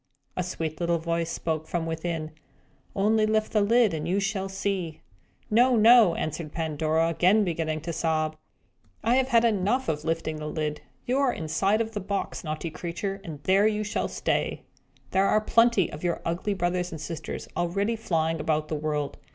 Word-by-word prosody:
A - - 0
sweet 165 -3 -4
little 170 -1 +1
voice 165 0 -1
spoke 160 -1 -2
from 170 -2 -2
within 160 -1 -3 0.6
"Only 215 +2 +3
lift 215 0 +1
the 215 - +3
lid, 225 -1 +4
and 155 0 -3
you 190 +3 +1
shall 195 -1 -2
see." 190 -4 -3 0.5
"No, 245 +3 +5
no," 225 -5 +7
answered 155 0 -4
Pandora, 160 0 0
again 185 +6 +4
beginning 160 -3 -2
to 170 +2 -4
sob, 155 -1 0 0.7
"I 235 +3 +3
have 265 -1 +2
had 235 -2 +4
enough 225 +4 +1
of 150 -1 -2
lifting 160 -1 -2
the 150 0 -5
lid! 150 -1 -3 0.2
You 255 +3 +1
are 275 -3 +3
inside 175 +7 0
of 225 0 -3
the 215 - -3
box, 200 0 -3
naughty 155 +1 -4
creature, 195 +4 -4
and 155 -6 -8
there 195 +5 +4
you 215 0 0
shall 210 - -1
stay! - - -1 0.5
There 195 +1 +3
are 215 - +4
plenty 230 -3 +3
of 150 - -8
your 175 -1 0
ugly 180 +5 -1
brothers 180 -1 -1
and 160 - -6
sisters 155 +2 -6
already 200 +6 0
flying 165 -6 -1
about 155 0 0
the 155 - -1
world. 150 -2 -2
175 Hz, 180 wpm, -27 LUFS, 160-210 Hz, 0.7 s, no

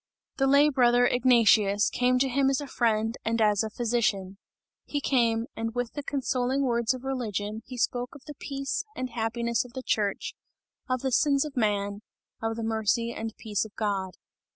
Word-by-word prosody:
The 270 - +2
lay 285 +2 +5
brother 245 -3 +4
Ignatius 230 -5 +4
came 250 0 +2
to 265 +2 +2
him 270 +1 +2
as 270 - +1
a 290 - -5
friend 225 -3 0
and 230 +1 0
as 210 -2 +3
a 220 - -3
physician. 215 -5 -1 0.5
He 290 - -1
came, 235 -5 +1
and 225 +1 -4
with 245 -1 -2
the 290 - -4
consoling 265 -1 -1
words 235 -1 +1
of 255 - -10
religion, 220 -5 -3
he 255 - -8
spoke 245 +1 -1
of 275 - -14
the 295 - -8
peace 275 -1 -3
and 255 -1 -4
happiness 235 0 -1
of 245 -1 -14
the 260 0 -6
church, 205 -4 -1 0.6
of 255 -1 0
the 265 - -1
sins 280 +2 +3
of 300 - -8
man, 205 -3 0 0.4
of 225 0 -1
the 230 - -4
mercy 225 +1 0
and 225 -1 -6
peace 210 -3 -2
of 220 -1 -11
God. 195 -3 -2
235 Hz, 185 wpm, -27 LUFS, 220-260 Hz, 0.6 s, lay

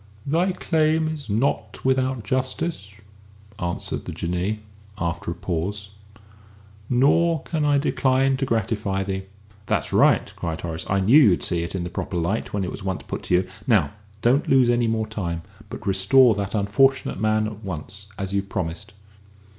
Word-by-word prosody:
"Thy 170 +6 +2
claim 160 -3 +1
is 155 -5 -5
not 115 +7 -1
without 130 -2 +1
justice," 130 0 -2 0.7
answered 85 -2 -3
the - - -5
Jinnee, 90 +5 -2 0.4
after 85 -3 -3
a 85 - -3
pause, 100 +3 -3 1.0
"nor 145 +5 +3
can 160 -3 -2
I 145 -1 +4
decline 135 -1 +2
to 135 - -1
gratify 105 -3 -1
thee." 95 0 -4 0.4
"That's - - -1
right," - - +4
cried 80 -2 -4
Horace; 80 -1 -4
"I 95 0 +2
knew 120 +11 +6
you'd 100 -10 +4
see 85 -2 0
it 85 +3 -4
in 90 - -2
the 90 - -5
proper 90 - -4
light 85 +6 -1
when 100 -1 -1
it 90 - -3
was - - -7
once 95 -7 -3
put - - -5
to 90 - +2
you. 90 +1 +1 0.2
Now, 100 - +3 0.3
don't 130 +5 +3
lose 130 -3 +5
any 120 -1 +2
more 110 -1 0
time, 85 -6 -4 0.3
but - - -8
restore 100 +6 +5
that 100 0 -3
unfortunate 110 +5 +2
man 110 0 +2
at 110 0 -7
once, 95 +2 -6
as 95 -1 -4
you've 100 0 -1
promised." 85 -1 -4
105 Hz, 170 wpm, -23 LUFS, 95-130 Hz, 1.0 s, knew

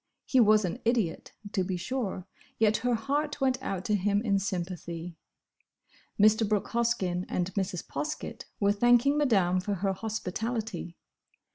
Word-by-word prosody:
He 260 - +3
was 215 -3 +5
an 185 +7 -3
idiot, 225 -8 0 0.2
to 190 - +1
be 185 0 -2
sure, 200 -3 -3 0.3
yet 215 -1 +3
her 245 0 +1
heart 290 +5 -1
went 260 -1 +1
out 195 -7 -3
to 210 - 0
him 205 0 +2
in 200 -4 +2
sympathy. 175 -3 -4 1.0
Mr. 215 +1 +5
Brooke 210 -2 0
Hoskyn 215 -7 0
and 180 +1 -1
Mrs. 185 -3 -2
Poskett 305 0 -5
were 200 0 +3
thanking 240 +6 +4
Madame 195 -11 +3
for 200 +2 -2
her 195 +1 0
hospitality. 220 -2 -4
210 Hz, 145 wpm, -29 LUFS, 185-235 Hz, 1.0 s, was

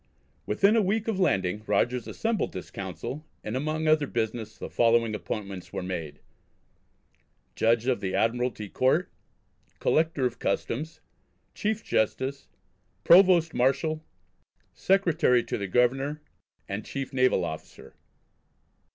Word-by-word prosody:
Within 200 - +3
a 225 - +4
week 210 +3 0
of 215 -4 -1
landing 95 - +1
Rogers 120 +4 +1
assembled 225 -1 -2
this 95 - -7
Council, 95 - -6 0.2
and 110 - -4
among 155 +4 -1
other 155 -2 +3
business 110 -2 -3
the - - -6
following 115 -1 +2
appointments 100 -3 -5
were - - -4
made: 85 -5 -5 1.3
Judge 115 +1 +2
of 130 -2 0
the 95 -1 -2
Admiralty 115 -2 0
Court, 130 - +1 0.7
Collector 160 -4 +1
of 125 -1 -2
Customs, 155 +7 -2 0.5
Chief 215 +1 -2
Justice, 130 +5 -1 0.6
Provost 175 -3 +6
Marshal, 155 +5 +1 0.7
Secretary 165 -10 +2
to - - -3
the 100 - -3
Governor, 135 +8 +1 0.5
and 100 +2 -4
Chief 135 -1 -5
Naval 130 -8 +3
Officer. 80 -2 -8
125 Hz, 120 wpm, -27 LUFS, 110-155 Hz, 1.3 s, Provost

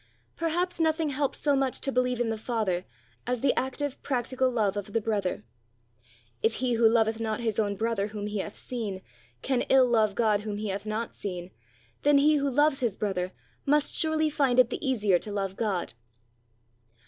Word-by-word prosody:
Perhaps 345 +2 -1
nothing 320 -1 +2
helps 280 0 -1
so 290 -2 +2
much 270 -1 0
to 275 - 0
believe 250 -1 +1
in 235 -2 +1
the - - -1
Father, 215 -6 -1 0.4
as 250 -2 -1
the 275 - +3
active 265 +1 -3
practical 260 0 0
love 215 -5 0
of 205 0 -5
the 225 - +3
brother. 205 - -2 1.0
If 225 0 +2
he 250 -1 0
who 230 -1 +5
loveth 225 -1 +2
not 220 0 -2
his 225 -2 +1 0.2
brother 220 -2 0
whom 210 -1 -5
he 210 0 -3
hath 205 +2 -5
seen, 210 -7 -5 0.4
can 260 -2 +1
ill 265 -1 +6
love 220 -4 +2
God 215 -3 +2
whom 210 -1 -4
he 210 0 -3
hath 200 +2 -4
not 220 +2 -3
seen, 180 -2 -6 0.5
then 290 0 +5
he 300 +2 +5
who 280 0 +1
loves 290 +1 +3
his 235 -7 0
brother 185 -3 -2 0.3
must 295 +1 +2
surely 315 -1 +1
find 275 -4 +2
it 250 -2 +5
the - - -4
easier 210 -9 +2
to 210 - -7
love 195 -2 -2
God! 200 - -2
230 Hz, 185 wpm, -28 LUFS, 210-270 Hz, 1.0 s, ill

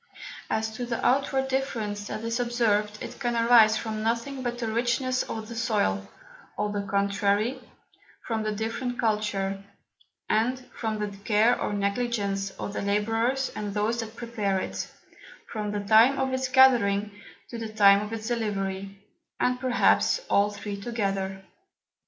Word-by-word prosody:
As 220 0 -1
to 245 - -3
the 235 -1 -2
outward 270 0 +2
Difference 225 -6 -2
that 215 - -5
is 230 +1 -1
observed, 215 -4 +1
it - - -8
can 240 -1 -1
arise 230 -2 +6
from 215 -1 -4
nothing 235 +5 -1
but 240 -1 -3
the 240 - -3
Richness 240 +3 0
of 220 -1 -5
the 235 - -7
Soil, 205 - 0 0.5
or 210 0 -1
the 205 -1 -2
contrary; 200 +5 0 0.6
from 225 -2 -1
the 215 0 -1
different 230 +4 -3
Culture, 205 -3 -1 0.6
and 230 +4 +1 0.2
from 220 -2 -3
the 210 -1 -4
Care 215 +3 +3
or - - -1
Negligence 200 -1 -1
of 200 - -5
the - - -3
Labourers 225 +6 0
and 205 -1 -4
those 220 +3 0
that 225 0 -5
prepare 220 -5 -1
it, - - -4 0.6
from 210 -2 -4
the 205 - -2
time 220 +6 +5
of 265 0 0
its 260 0 0
gathering, 235 -6 +4 0.4
to 235 - -5
the 225 -1 -5
time 200 -2 +6
of 210 +1 -6
its 225 -1 -5
Delivery, 195 -4 -3 0.4
and 250 0 +1
perhaps 255 - +3
from - - -14
all 200 +1 +4
three 205 -1 -6
together. 195 -4 -2
220 Hz, 160 wpm, -27 LUFS, 205-240 Hz, 0.6 s, arise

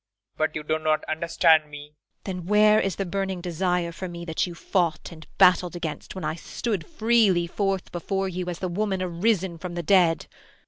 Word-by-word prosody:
But 155 0 -1
you 155 - -3
do 155 +1 -1
not 155 0 +1
understand 160 -1 +3
me. 145 0 -8
IRENE. 150 +1 -15 0.5
Then 175 - -9
where 210 +1 +5
is 195 -3 -1
the 195 - -2
burning 195 0 -2
desire 175 0 -1
for 185 +2 -6
me 170 0 -7
that 160 +2 -1
you 175 - -8
fought 175 -2 -1
and 160 -1 -12
battled 180 -1 +5
against 165 0 -5
when 185 -4 -5
I 155 - -1
stood 200 +3 -4
freely 220 - +3
forth 195 +1 -2
before 195 +2 -2
you 180 -1 -4
as 175 - -4
the 185 - -3
woman 190 +1 -1
arisen 185 -1 0
from 175 +1 -6
the 175 - -3
dead? 165 -3 +3
175 Hz, 195 wpm, -25 LUFS, 165-195 Hz, 0.5 s, where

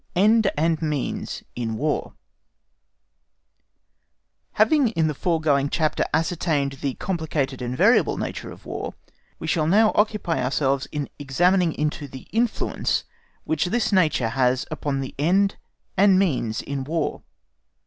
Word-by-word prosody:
Ends 215 +3 +4
and 160 +1 +1
Means 150 -4 -3
in 115 -2 -3
War 150 +3 -2 2.4
Having 300 -5 +4
in 165 -8 0
the 155 - 0
foregoing 150 -3 +1
chapter 155 -1 0
ascertained 155 -4 0
the 135 -2 -2
complicated 155 -8 -2
and 125 +1 -3
variable 215 - +4
nature - - -4
of - - -14
War, - - -5 0.4
we - - -7
shall 155 -3 +1
now 215 +5 +5
occupy 210 - +1
ourselves 135 +1 0
in 145 -2 -4
examining 175 +6 +2
into 150 0 -2
the 130 -1 -10
influence 235 +2 0 0.4
which 160 0 0
this 225 +6 0
nature 155 - +2
has 125 +1 +1
upon 145 -3 -2
the 130 - -6
end 195 +6 +2 0.4
and 195 0 +5
means 130 - 0
in 140 -1 -4
War. 160 +3 -2
155 Hz, 130 wpm, -24 LUFS, 140-185 Hz, 2.4 s, now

